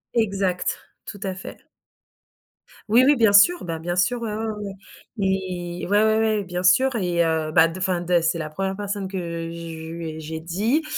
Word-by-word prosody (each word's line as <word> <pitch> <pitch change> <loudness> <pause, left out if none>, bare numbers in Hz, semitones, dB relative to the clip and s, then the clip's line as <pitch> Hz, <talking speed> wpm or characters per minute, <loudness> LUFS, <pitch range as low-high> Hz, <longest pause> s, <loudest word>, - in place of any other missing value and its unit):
Exact, 195 -5 0 0.3
tout 205 - -8
à 190 -1 -2
fait. 185 - -10 1.3
Oui, 235 +4 +6
oui, 290 +2 +5
bien 225 -5 +4
sûr, 275 +14 +6
bah, 165 -2 -4
bien 175 +2 -3
sûr 210 +7 +1
ouais, 220 -2 -3
ouais, 220 +1 -3
ouais, 220 - -2
ouais. 205 -2 -6 0.4
Mais, 185 -4 -2
ouais, 205 +3 +3
ouais, 220 0 +3
ouais, 215 -2 +1
bien 180 -1 -4
sûr 260 +9 +4
et 175 -4 +1
heu, 160 -1 0
bah 165 0 +6
de 165 - -8
enfin 180 -1 0
de 175 0 +2
c'est 165 +1 0
la 155 -2 -4
1re 190 +4 -3
personne 200 -1 -4
que 190 0 -5 0.3
je 165 -1 -7
lui 165 -1 -6
j'ai 160 +1 -6
dit 210 - 0
185 Hz, 195 wpm, -23 LUFS, 170-210 Hz, 1.3 s, Oui